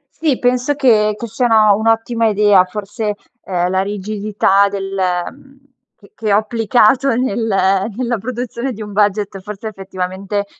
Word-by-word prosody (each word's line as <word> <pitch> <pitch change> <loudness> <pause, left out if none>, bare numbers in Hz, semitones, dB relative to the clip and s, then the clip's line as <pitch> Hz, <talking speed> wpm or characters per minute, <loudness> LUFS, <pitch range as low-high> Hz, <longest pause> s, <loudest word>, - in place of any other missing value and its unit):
Sì 305 -5 0
penso 250 +3 0
che, 215 -6 +3
che 235 - -5
siano 220 -2 +3
un'ottima 225 +1 +1
idea 205 -3 +4
forse, 210 +2 -4 0.3
uhm, 180 -2 -1
la 190 - +1
rigidità 200 0 +1
del, 195 -1 -5
mhmm, 190 +10 -3 0.4
che 200 - -21
che 215 -2 -3
ho 200 - +5
applicato 230 +3 +2
nel 230 -2 -1 0.5
nella 245 -2 -1
produzione 245 +2 -4
di 220 - -7
un 210 -1 -9
budget, 205 -1 0
forse 210 +3 -7
effettivamente 195 +1 -4
210 Hz, 140 wpm, -17 LUFS, 200-235 Hz, 0.5 s, ho